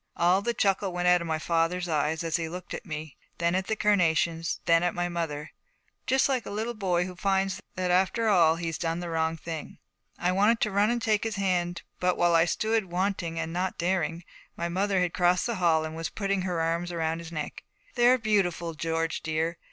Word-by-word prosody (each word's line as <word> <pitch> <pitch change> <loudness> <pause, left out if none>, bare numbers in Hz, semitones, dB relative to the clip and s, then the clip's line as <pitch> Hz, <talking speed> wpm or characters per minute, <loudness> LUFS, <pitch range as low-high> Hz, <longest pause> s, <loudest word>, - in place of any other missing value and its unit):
All 180 +3 +4
the 235 +3 -1
chuckle 195 -1 +1
went 180 0 -1
out 180 0 +5
of 170 - -4
my 160 -1 0
father's 170 +2 0
eyes: 155 0 0
he 165 -2 -1
looked 180 +1 -7
at - - -7
me, 155 -2 -6 0.2
then 170 0 +1
at 185 0 -1
the 220 - 0
carnations, 170 -5 +1
then 165 -1 +4
at 175 0 0
my 175 0 0
mother, 160 -4 -4 0.6
just 265 +1 +3
like 260 -4 0
a - - -4
little 220 +4 -3
boy 180 -5 0
who 185 -1 -7
finds 195 0 0
that 185 -1 -1
after 190 +5 +2
all 170 -6 +5
he's 165 -1 -4
done 165 0 -1
the 175 -1 -5
wrong 160 0 0
thing. 160 -1 -7 0.4
I 180 +1 +1
wanted 210 +5 +3
to 215 - +1
run 205 +2 +3
and 240 -1 -1
take 215 -2 +2
his 225 -1 -2
hand; 175 -3 -1 0.2
but 180 0 +1
while 175 0 +3
I 165 0 +5
stood, 220 +4 0
wanting 180 -2 -2
and 165 0 -3
not 180 +1 -2
daring, 170 -1 -1 0.3
my 170 - -1
mother 190 +1 +1
had 180 -2 0
crossed 180 0 +2
the 235 -3 -2
hall 165 -3 +3
and 160 0 -6
was 165 0 -3
putting 195 -2 -1
her 180 -2 -2
arms 170 +2 -1
around 165 -1 -1
his 170 0 -9
neck. 155 -3 -5 0.3
'They're 245 +1 +5
beautiful, 190 -7 0
George 165 +1 -2
dear. 160 +2 -2
175 Hz, 215 wpm, -27 LUFS, 165-195 Hz, 0.6 s, out